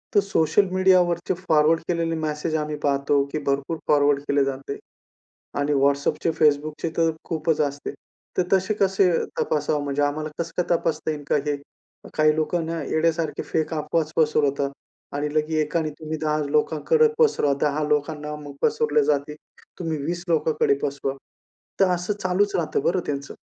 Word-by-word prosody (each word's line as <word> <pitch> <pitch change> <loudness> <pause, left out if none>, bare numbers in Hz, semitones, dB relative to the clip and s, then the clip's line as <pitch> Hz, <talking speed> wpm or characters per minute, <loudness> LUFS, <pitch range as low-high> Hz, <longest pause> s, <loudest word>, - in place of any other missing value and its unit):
तर 205 - +8
सोशल 195 +1 +2
मीडियावरचे 185 -2 +3 0.2
फॉरवर्ड 155 +1 +4
केलेले 165 -2 0
मेसेज 155 0 -2
आम्ही 150 -1 -2
पाहतो, 140 0 +2
की 155 - -2
भरपूर 140 +4 0
फॉरवर्ड 145 -1 +4
केले 140 -1 +3
जाते 135 +1 -4 0.8
आणि 145 +1 +1
WhatsAppचे, 140 +4 +1
Facebookचे 150 +2 +2
तर 165 -1 +3
खूपच 160 -1 -1
असते. 145 -1 -2 0.5
तर 185 - +4
तसे 190 +2 +2
कसे 195 -2 +3 0.3
तपासावं? 150 -1 0
म्हणजे 140 0 -1
आम्हाला 155 +2 -1
कसं 170 +1 -1
काय - - -3
तपासता 155 -1 -2
येईल 145 -1 -5
का? - - +3
हे 145 - 0 0.6
काही 155 0 +4
लोकांना 165 0 -1
येड्यासारखे 160 +1 0
फेक 160 +1 -1
अफवा 150 +2 0 0.2
पसरवतात 145 -3 +2 0.5
आणि 145 +1 -2
लगेच 155 +1 +1
एकाने 155 +1 -1
तुम्ही 155 0 -4
10 155 0 +1
लोकांकडे 160 - +3
पसरवा, 415 - +3
10 150 +1 +1
लोकांना 150 0 -1
मग 145 -1 -9
पसरले 450 - +2
जातील, 150 0 0 0.4
तुम्ही 165 -3 -2
20 175 +3 -3
लोकांकडे 155 -3 +2
पसरवा. 140 -1 -2 0.6
तर 195 - +5
असं 180 +4 -2
चालूच 190 +3 +1
राहतं 160 -5 0
बरं 185 - +2
त्यांचं. 140 -1 -4
155 Hz, 150 wpm, -24 LUFS, 145-170 Hz, 0.8 s, तर